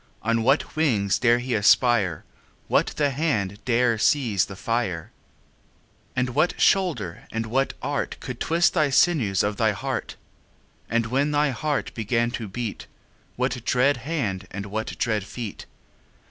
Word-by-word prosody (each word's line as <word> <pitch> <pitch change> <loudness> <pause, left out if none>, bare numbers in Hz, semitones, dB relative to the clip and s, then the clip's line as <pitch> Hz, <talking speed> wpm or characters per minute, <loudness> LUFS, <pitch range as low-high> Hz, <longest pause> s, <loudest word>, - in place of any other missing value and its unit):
On 115 +1 +1
what 135 +6 +1
wings 110 -11 +1
dare 120 -1 +4
he 125 +1 -3
aspire? 105 - +3 0.4
What - - +2
the 145 -2 +2
hand 110 - -1
dare 120 -2 +2
seize 110 -6 +2
the 95 - -9
fire? 95 -5 -2 1.0
And 125 0 0
what 155 +7 +1
shoulder 145 - +1
and 115 0 -2
what 135 +5 0
art 145 - -2
Could 125 -2 -7
twist 170 +1 +2
the 155 -4 +2
sinews 130 - +3
of 105 0 -1
thy 110 -2 +2
heart? 95 - -4 0.7
10 - - -5
And 115 - +1
when 135 +5 +1
thy 150 -1 +2
heart 145 +3 -2
began 115 +1 0
to 115 -2 -5
beat, 110 +2 -5 0.5
What 125 -1 -2
dread 130 +3 +2
hand 115 - -3
and 100 +1 -6
what 110 +2 -4
dread 110 -4 0
feet? 110 +1 -7
120 Hz, 150 wpm, -24 LUFS, 105-135 Hz, 1.0 s, dare